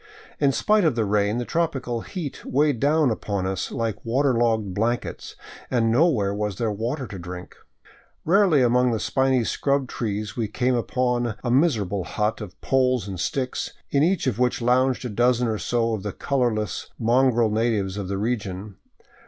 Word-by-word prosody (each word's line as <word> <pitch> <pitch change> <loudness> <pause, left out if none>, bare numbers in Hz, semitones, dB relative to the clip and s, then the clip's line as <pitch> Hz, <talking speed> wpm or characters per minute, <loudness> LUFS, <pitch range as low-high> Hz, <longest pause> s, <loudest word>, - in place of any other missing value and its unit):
In 140 -2 +3
spite 210 +8 +2
of 155 -7 +2
the 115 -2 +1
rain 105 +1 +1
the 120 - -2
tropical 135 -8 -1
heat 170 - -6
weighed 145 -2 +1
down 145 0 +3
upon 100 -3 -2
us 95 0 -2
like 115 -3 -3
water 130 +4 +1
logged 110 -4 +1
blankets, 115 +5 -2 0.3
and 115 -3 +2
nowhere 120 - +3
was 105 -1 -2
there 115 -2 0
water 120 +7 -3
to 100 -5 -8
drink. 90 +1 -8 0.7
Rarely 180 -5 +4
among 125 +1 +3
the 115 -2 0
spiny 130 0 +1
scrub 140 +3 0
trees 105 -4 -4
we 115 -2 -1
came 125 +4 0
upon 120 -1 0
a 120 - -1
miserable 110 - +2
hut 105 +4 -1
of 100 -5 -9
poles 130 -5 +1
and 95 -3 -6
sticks, 130 +6 -2 0.2
in 140 - +3
each 175 +3 +2
of 125 -4 -1
which 125 -1 +1
lounged 125 +2 +2
a - - 0
dozen 120 +2 +2
or 110 -2 -1
so 115 +4 0
of 110 - -3
the 105 -1 -4
colorless, 115 -8 -1
mongrel 120 -1 +3
natives 105 -4 0
of 100 -2 -4
the 100 +1 -2
region. 100 -3 -3
120 Hz, 175 wpm, -24 LUFS, 105-130 Hz, 0.7 s, Rarely